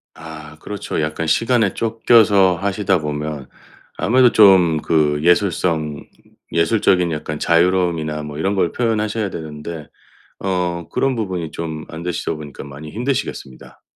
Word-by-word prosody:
아 75 Hz, -2 st, -10 dB
그렇죠. 105 Hz, -5 st, -4 dB
약간 80 Hz, +1 st, -2 dB
시간에 115 Hz, 0 st, +2 dB
쫓겨서 110 Hz, -5 st, +4 dB
하시다 95 Hz, 0 st, 0 dB
보면 75 Hz, -2 st, -4 dB, 0.5 s
아무래도 125 Hz, +1 st, +4 dB
좀 95 Hz, -6 st, +6 dB
그 75 Hz, -2 st, +1 dB
예술성 85 Hz, -4 st, +1 dB, 0.5 s
예술적인 90 Hz, 0 st, +2 dB
약간 75 Hz, -1 st, -4 dB
자유로움이나 85 Hz, -3 st, +1 dB
뭐 75 Hz, -1 st, -7 dB
이런 95 Hz, +5 st, 0 dB
걸 85 Hz, -3 st, +1 dB
표현하셔야 110 Hz, -2 st, -1 dB
되는데 80 Hz, -1 st, -7 dB, 0.5 s
어 90 Hz, -3 st, -2 dB
그런 135 Hz, -1 st, 0 dB
부분이 95 Hz, -8 st, -3 dB
좀 80 Hz, -2 st, -5 dB
안 80 Hz, +1 st, -8 dB
되시다 85 Hz, -1 st, -2 dB
보니까 75 Hz, -3 st, -9 dB
많이 70 Hz, +2 st, -10 dB
힘드시겠습니다. 120 Hz, -, -4 dB
85 Hz, 315 characters per minute, -19 LUFS, 75-100 Hz, 0.5 s, 좀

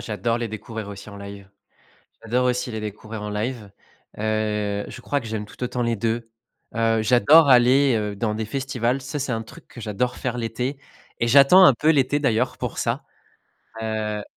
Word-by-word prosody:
J'adore 115 Hz, +2 st, -2 dB
les 120 Hz, -1 st, -3 dB
découvrir 110 Hz, 0 st, -7 dB
aussi 100 Hz, +1 st, -9 dB
en 100 Hz, -, -10 dB
live. 100 Hz, -1 st, -10 dB, 0.7 s
J'adore 120 Hz, +3 st, 0 dB
aussi 125 Hz, 0 st, -1 dB
les 110 Hz, -2 st, -4 dB
découvrir 105 Hz, +1 st, -7 dB
en 105 Hz, -, -4 dB
live, 105 Hz, 0 st, -4 dB, 0.5 s
heu, 105 Hz, -1 st, -1 dB
je -, -, -9 dB
crois 145 Hz, +3 st, -1 dB
que 115 Hz, -, -10 dB
j'aime 110 Hz, -1 st, -4 dB
tout 115 Hz, -, -14 dB
autant 125 Hz, 0 st, -2 dB
les 115 Hz, -1 st, 0 dB
2, 115 Hz, +2 st, -2 dB, 0.5 s
heu, 115 Hz, -1 st, +2 dB
j'adore 125 Hz, +8 st, +6 dB
aller, 130 Hz, +1 st, +5 dB
heu, 105 Hz, -2 st, -3 dB
dans 105 Hz, +1 st, -1 dB
des 110 Hz, +1 st, -3 dB
festivals, 130 Hz, +1 st, -2 dB
ça 145 Hz, +3 st, -5 dB
c'est 135 Hz, -1 st, -3 dB
un 115 Hz, 0 st, -2 dB
truc 110 Hz, -, -15 dB
que 120 Hz, -, -12 dB
j'adore 115 Hz, +4 st, -2 dB
faire 125 Hz, -1 st, -3 dB
l'été 125 Hz, +4 st, -3 dB, 0.4 s
et 115 Hz, -, +1 dB
j'attends 140 Hz, +9 st, +7 dB
un 140 Hz, -, +7 dB
peu 150 Hz, +6 st, +2 dB
l'été 145 Hz, -1 st, +2 dB
d'ailleurs 120 Hz, -6 st, 0 dB
pour -, -, -4 dB
ça, -, -, -1 dB, 0.8 s
heu 110 Hz, -1 st, -3 dB
115 Hz, 190 wpm, -23 LUFS, 105-125 Hz, 0.8 s, j'attends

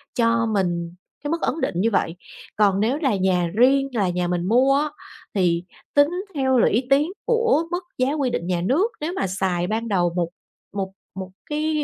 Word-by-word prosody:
cho 230 Hz, -1 st, +2 dB
mình 175 Hz, -3 st, -1 dB, 0.3 s
cái 290 Hz, -, -3 dB
mức 335 Hz, -, -1 dB
ấn 315 Hz, -, -1 dB
định -, -, -1 dB
như 220 Hz, +6 st, +2 dB
vậy. 175 Hz, -4 st, 0 dB, 0.4 s
Còn 200 Hz, -2 st, +3 dB
nếu 230 Hz, +7 st, +1 dB
là 265 Hz, -9 st, +2 dB
nhà 185 Hz, -2 st, +1 dB
riêng 270 Hz, +4 st, +4 dB
là 200 Hz, -5 st, +1 dB
nhà 180 Hz, 0 st, -1 dB
mình 175 Hz, 0 st, -1 dB
mua 255 Hz, +5 st, +4 dB
á, 300 Hz, +1 st, 0 dB, 0.5 s
thì 175 Hz, -3 st, +2 dB, 0.3 s
tính 285 Hz, +1 st, +5 dB, 0.2 s
theo 265 Hz, -3 st, +2 dB
là 235 Hz, -, +5 dB
lũy 235 Hz, +5 st, +2 dB
tiến 290 Hz, +5 st, +3 dB
của 465 Hz, -8 st, +3 dB
mức 355 Hz, +1 st, -2 dB
giá 260 Hz, +2 st, +1 dB
quy 280 Hz, -4 st, 0 dB
định 175 Hz, -8 st, -3 dB
nhà 180 Hz, -2 st, 0 dB
nước. 305 Hz, -, +2 dB
Nếu 320 Hz, +4 st, -2 dB
mà 370 Hz, -, -1 dB
xài 185 Hz, -2 st, -1 dB
ban 225 Hz, +3 st, -2 dB
đầu 175 Hz, -4 st, +1 dB
một 170 Hz, -2 st, 0 dB, 0.4 s
một 195 Hz, -1 st, -3 dB, 0.2 s
một 190 Hz, -1 st, -6 dB, 0.2 s
cái 305 Hz, 0 st, 0 dB
230 Hz, 205 wpm, -23 LUFS, 185-285 Hz, 0.5 s, tính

